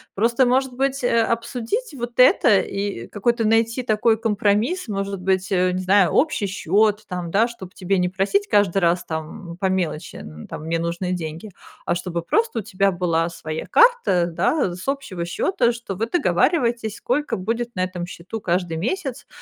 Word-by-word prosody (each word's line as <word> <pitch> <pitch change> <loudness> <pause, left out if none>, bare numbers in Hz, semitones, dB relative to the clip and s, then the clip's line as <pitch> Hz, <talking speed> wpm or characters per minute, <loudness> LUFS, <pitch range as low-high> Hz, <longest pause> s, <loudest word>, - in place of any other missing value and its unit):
Просто, 235 +5 +2
может 260 +1 +1
быть, 270 +1 -1
а, 230 -2 +2
обсудить 245 - -2
вот 240 0 -6
это 235 -4 +6
и 195 - -4
какой-то 230 +2 0
найти 225 +3 +2
такой 220 0 +2
компромисс, 225 - 0
может 195 -2 -3
быть, 190 +1 0
э, 185 -1 +2
не 185 +1 -2
знаю, 190 -2 +4
общий 280 -9 +2
счёт 210 +2 +1
там, 180 -3 -4
да, 220 +4 +3
чтоб 195 -7 -10
тебе 190 0 0
не 180 - +1
просить 200 - 0
каждый 205 - +3
раз, 175 -1 +1
там, 160 +2 -6
по 190 - 0
мелочи 175 -5 -2
н 75 +1 -10
там: - - -7
"Мне 165 +1 -1
нужны 170 +2 -2
деньги", 170 +4 -6 0.3
а, - - +1
чтобы 175 -1 -4
просто 445 - 0
у - - -2
тебя 195 -1 +1
была 170 -2 0
своя 155 -2 -6
карта, 475 - +4
да, 175 - 0
с 185 +8 -10
общего 235 -11 -3
счёта, 240 - +1
что 235 -4 -6
вы 225 +5 -2
договариваетесь, 235 - +1
сколько 255 -3 -1
будет 230 +5 -3
на 185 - 0
этом 180 -1 -4
счету 180 +5 -7
каждый 175 -3 -1
месяц, 260 - -3
200 Hz, 175 wpm, -22 LUFS, 180-235 Hz, 0.3 s, это